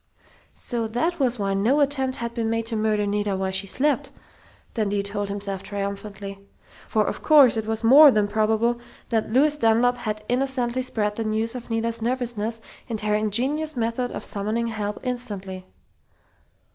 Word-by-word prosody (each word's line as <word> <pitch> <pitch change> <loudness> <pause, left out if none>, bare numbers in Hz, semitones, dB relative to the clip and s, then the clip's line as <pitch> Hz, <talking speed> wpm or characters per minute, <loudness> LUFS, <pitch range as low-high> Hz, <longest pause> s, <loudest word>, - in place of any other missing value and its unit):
So 235 -3 -3
that 320 +10 -1
was 250 -3 +1
why 200 -2 -1
no 225 +9 +2
attempt 270 -2 +1
had 235 0 -4
been 230 -2 -1
made 230 0 -1
to 225 0 -2
murder 215 -1 +1
Nita 205 -1 -1
while 190 0 -1
she 190 +1 -1
slept! 290 +8 +1 0.6
Dundee 205 -3 0
told 200 0 -3
himself 200 -1 -3
triumphantly. 200 0 -5 0.5
For 215 -1 +1
of - - -4
course 285 -7 +6
it 220 -1 -3
was 225 +1 -2
more 285 +6 +9
than 210 -5 +2
probable 220 +3 +1 0.3
that 220 -1 0
Lois 290 +5 +3
Dunlap 245 0 +3
had 215 -3 -4
innocently 255 -1 0
spread 210 -4 -1
the 225 - -1
news 220 +1 -1
of 245 -2 -8
Nita's 230 0 -2
nervousness 235 -2 -2 0.3
and 225 -2 -3
her 210 0 0
ingenious 255 +9 0
method 235 +2 -1
of - - -6
summoning 220 +3 -2
help 210 -2 -3
instantly.... 195 -7 -5
225 Hz, 165 wpm, -24 LUFS, 210-245 Hz, 0.6 s, more